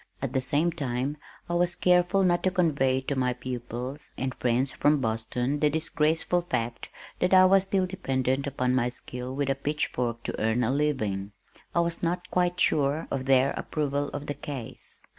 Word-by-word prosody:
At - - -3
the 130 - +1
same 150 +6 +1
time, 140 -2 -2 0.3
I 175 - -3
was 175 0 +2
careful 180 +3 +3
not 175 -1 +3
to 185 - +2
convey 140 -8 +2
to 140 +2 -2
my 125 -1 +1
pupils 125 +3 -6
and 130 0 -2
friends 125 +2 0
from 150 +3 +2
Boston 120 +4 -1
the 150 - +3
disgraceful 160 +2 +1
fact 120 -8 -3 0.3
that 180 +1 +3
I 185 0 +8
was 195 +1 +5
still 190 -1 +1
dependent 135 -7 -1
upon 125 -2 0
my 125 -1 +2
skill 125 +1 -6
with 140 -1 0
a - - +3
pitch 145 +2 -1
fork 120 -1 -2
to - - -4
earn 110 +3 +2
a 120 - +1
living. 110 -9 -1 0.4
I 170 - +4
was 170 0 -2
not 175 +1 -2
quite 180 0 +1
sure 145 -1 +2
of 130 -1 -2
their 135 0 +4
approval 145 -1 -2
of 145 0 -6
the 145 - -3
case. 135 -6 -8
140 Hz, 185 wpm, -27 LUFS, 125-170 Hz, 0.4 s, I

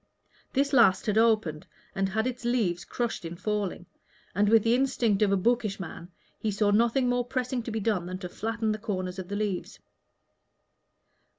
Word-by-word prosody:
This 280 +1 +1
last 210 -8 +5
had 215 0 +2
opened, 215 -9 +2 0.3
and 195 0 0
had 220 +3 0
its 250 -1 -3
leaves 220 -8 0
crushed 235 -4 -3
in 165 +1 -6
falling; 200 -2 -2 0.5
and, 205 +2 +2
with 225 -1 +5
the 230 - +3
instinct 245 -5 +1
of 205 -2 +4
a 200 - +3
bookish 220 0 +1
man, 175 -1 -8 0.3
he 220 - -1
saw 205 0 +1
nothing 235 +4 +3
more 245 0 +1
pressing 255 0 -2
to 235 - -6
be 220 0 -2
done 200 -5 0
than 185 0 -4
to 185 -1 -6
flatten 225 +2 -2
the 215 - -3
corners 185 -4 -3
of 185 - -6
the 200 - -4
leaves. 205 -3 -3
215 Hz, 185 wpm, -28 LUFS, 190-235 Hz, 0.5 s, last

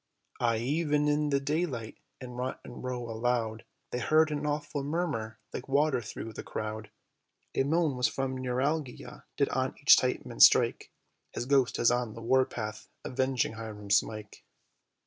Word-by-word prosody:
Aye, 115 -2 +2
even 150 +4 +1
in 150 0 +2
the 140 -1 +2
daylight, 140 -6 -2 0.2
in 125 -1 -8
Rotten 125 0 -6
Row, 125 -2 -4
aloud 115 -1 -1 0.3
They 125 - -2
heard 155 +4 +3
an 150 0 -2
awful 145 -1 -2
murmur 140 -8 -2 0.2
like 125 - -5
water 140 -2 +2
thro' 110 0 -7
the - - -7
crowd; 110 0 -5 0.6
A - - +1
moan 150 -1 +1
as 125 - +4
from 135 -1 -2
neuralgia 130 +2 -3
did - - +2
on - - -1
each - - +8
tympan - - -1
strike, - - +6 0.4
"His - - -3
ghost 135 -2 +2
is 120 - +4
on 120 -3 -1
the 115 - -8
war 130 +2 +4
path 110 -3 -6 0.2
avenging 130 -2 0
Hiram 105 -3 -7
Smike." 105 0 0
125 Hz, 155 wpm, -30 LUFS, 115-145 Hz, 0.6 s, each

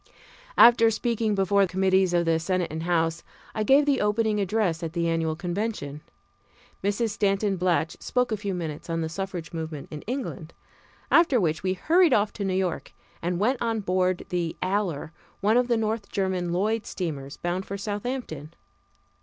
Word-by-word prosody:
After 235 -1 +8
speaking 225 -1 0
before 195 0 +3
committees 190 0 +2
of 175 -1 +2
the 165 0 +2
Senate 180 0 -1
and 160 +1 -4
House, 165 -1 0 0.3
I 215 - -2
gave 270 +7 +5
the 280 -2 +2
opening 210 0 +1
address 195 -4 0
at 165 -1 -4
the 170 -1 0
annual 165 -1 0
convention. 175 -4 -3 0.8
Mrs. 205 +3 0
Stanton 200 -1 +1
Blatch 175 -3 0
spoke 250 -1 0
a - - +2
few 200 -2 -3
minutes 160 -2 -5
on 165 0 -1
the 160 - -2
suffrage 175 -2 -5
movement 160 -3 -5
in 150 -1 -6
England, 230 - -5 0.6
after 325 -7 +5
which 160 -5 0
we 185 0 0
hurried 330 - +3
off 205 -1 +2
to 205 - -4
New 190 -1 0
York, 185 -3 -2 0.3
and 175 +1 -1
went 245 +6 +1
on 225 -2 0
board 185 -1 0
the 175 -2 -2
Aller, 185 -6 -1 0.3
one 210 +3 +2
of 245 0 +3
the 235 -2 +2
North 220 -1 -2
German 185 -3 -1
Lloyd 210 +5 0
steamers, 145 -6 -5
bound 175 +2 -3
for 200 - -4
Southampton. 205 - -5
190 Hz, 170 wpm, -26 LUFS, 170-215 Hz, 0.8 s, After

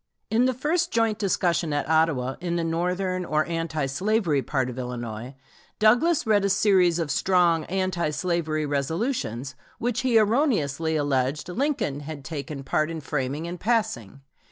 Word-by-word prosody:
In 230 +3 +3
the 260 - +2
first 330 +7 0
joint 225 -2 +1
discussion 175 -4 +1
at 145 - -1
Ottawa, 155 -5 +2
in 175 -1 -2
the 170 - 0
northern 180 +3 -1
or 155 -2 0
anti 165 -3 -2
slavery 170 +1 +1
part 130 -2 -1
of 125 0 -6
Illinois, 120 0 -5 0.4
Douglas 245 +10 +3
read 210 -2 +3
a 200 - +2
series 190 -4 +3
of 165 -4 -2
strong 175 -4 +2
anti 185 -3 -1
slavery 155 -1 -1
resolutions 140 - -2 0.2
which 240 -1 -1
he 250 -3 +3
erroneously 205 - +2
alleged 145 +1 0
Lincoln 240 - -1
had 145 -2 -8
taken 145 -2 -5
part 155 +3 0
in 165 -1 -4
framing 140 +1 -3
and 175 +1 -6
passing. 205 - -1
165 Hz, 155 wpm, -25 LUFS, 145-205 Hz, 0.4 s, In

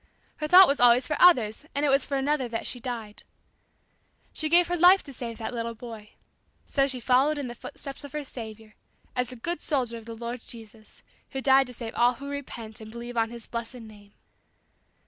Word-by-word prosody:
Her 305 - -3
thought 365 +3 +9
was 280 - +1
always 245 +1 +6
for 300 - -1
others, 245 -11 +5
and 285 +1 +1
it - - +2
was 275 +1 +3
for 280 - -1
another 270 -1 0
that 230 -1 -4
she 250 - -3
died. 230 -4 -6 1.1
She 310 - 0
gave 345 +2 +5
her 355 - -1
life 360 +3 +6
to 275 - -11
save 230 -2 -6
that 230 - -5
little 230 -1 -4
boy. 225 -2 -10 0.5
So 275 -1 +1
she 260 -2 -2
followed 265 +5 +3
in 285 - -3
the 240 - -6
footsteps 275 +4 -7
of 285 - -10
her 300 -1 -3
Saviour, 220 -4 -9 0.4
as 250 0 -1
a - - -8
good 325 +7 -4
soldier 245 -6 -1
of 225 - -16
the 230 - -7
Lord 235 +1 -5
Jesus 225 -2 -13 0.3
who 270 - -2
died 270 0 +4
to 250 - -8
save 230 -1 -6
all 245 +1 +3
who 280 +3 -8
repent 235 -6 -6
and 220 - -9
believe 235 +2 -8
on 225 -1 +1
His 235 -1 -9
blessed 235 +1 -6
name." 210 -3 -14
245 Hz, 210 wpm, -27 LUFS, 230-280 Hz, 1.1 s, thought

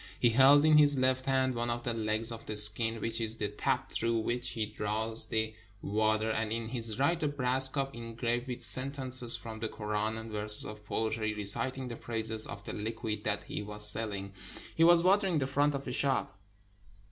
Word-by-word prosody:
He 120 - +2
held 135 +5 +5
in 155 -1 +5
his 145 -1 +3
left 130 0 -1
hand 130 -1 0
one 120 0 -3
of 120 0 -4
the 120 - -3
legs 110 +1 -3
of 115 -1 -10
the 105 - -3
skin, 110 +2 +3
which 115 +1 -2
is 110 0 0
the 105 -1 -3
tap 105 - -3
through 115 0 -1
which 120 +2 -4
he 110 -2 -3
draws 110 +2 -2
the 110 0 -2 0.3
water, 110 +1 -1
and 110 -1 -3
in 115 0 -4
his 115 -3 -5
right, 165 +6 0
a 150 - 0
brass 130 -2 0
cup 135 0 -4
engraved 115 +1 -4
with 125 -1 -6
sentences 130 -2 +8
from 110 -1 -8
the 110 0 -4
Koran 105 +1 -4
and 110 0 -9
verses 105 0 +2
of 105 0 -10
poetry, 110 -1 -3
reciting 125 +6 0
the 115 -2 -8
praises 110 -1 0
of 100 - -9
the - - -8
liquid 110 -1 -5
that 105 -1 -2
he - - -6
was 105 0 -4
selling. 100 -2 -5 0.4
He 165 - +1
was 170 0 +5
watering 190 -2 +2
the 135 - -1
front 145 +2 0
of 140 - -6
a - - -4
shop. 135 -3 -1
115 Hz, 205 wpm, -29 LUFS, 110-130 Hz, 0.4 s, sentences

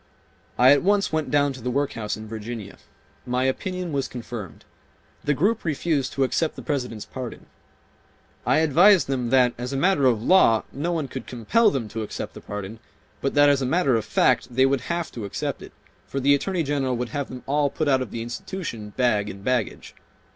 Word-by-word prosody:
I 125 +2 +7
at 145 - +5
once 200 -1 +2
went 155 -1 0
down 145 -1 +2
to 130 - -10
the 125 - -2
workhouse 125 -6 -2
in 110 0 -9
Virginia. 110 -1 -7 0.5
My 125 0 -1
opinion 180 +6 -2
was 140 -2 -1
confirmed. 115 -8 -8 0.6
The 145 - +1
group 210 +10 +1
refused 155 -3 -1
to 135 - +1
accept 155 +4 0
the - - -9
President's 125 -8 -3
pardon. 125 -3 -7 1.0
I 155 - +3
advised 175 +5 +5
them 130 -3 -2
that 125 -1 +4
as 125 +2 -4
a - - -1
matter 145 -3 +3
of 120 -4 +3
law 120 -10 +5
no 150 +6 -2
one 160 -5 -1
could 130 -2 -7
compel 125 - +2
them 130 -6 -3
to 110 +2 -4
accept 105 - -5
the - - -10
pardon, 105 +2 -7 0.4
but 135 - -1
that 145 0 +6
as 140 -1 +3
a - - 0
matter 140 -3 +2
of 110 - 0
fact - - +2
they 130 +1 +5
would 135 -1 +1
have 170 +2 -3
to 115 - -7
accept 100 - -4
it, - - -10 0.4
for 135 - -3
the 140 +2 +4
Attorney 175 +4 0
General 135 -4 -1
would 125 0 -3
have 140 +3 -3
them 125 -1 -8
all 145 +1 +1
put 155 +2 -2
out 135 -2 +3
of 130 - -4
the 115 - -5
institution 120 - -6
bag 105 -5 +2
and 100 0 -9
baggage. 125 -4 -2
130 Hz, 205 wpm, -24 LUFS, 120-150 Hz, 1.0 s, I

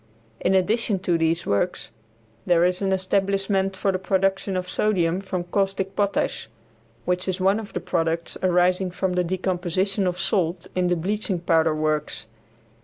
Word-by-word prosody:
In 190 - +2
addition 205 +2 +1
to 180 -2 +1
these 165 +1 +1
works, 110 - -1 0.6
there 175 -1 +4
is 180 +1 0
an 195 -1 0
establishment 195 0 0
for 195 - +1
the 185 - -2
production 190 0 0
of 180 0 -3
sodium 180 -4 +1
from 190 -2 -3
caustic 195 +1 -1
potash, 200 - -1 0.6
which 180 +1 -1
is 185 0 -1
one 195 +3 +3
of 215 -2 -9
the - - -1
products 165 0 -1
arising 180 +1 +2
from 180 +1 -2
the 180 0 +1
decomposition 185 +2 -1
of 180 0 -1
salt 175 -4 0
in 180 -1 +1
the 175 - +2
bleaching 195 +2 -2
powder 165 -2 +2
works. 155 -3 -1
185 Hz, 160 wpm, -24 LUFS, 175-195 Hz, 0.6 s, there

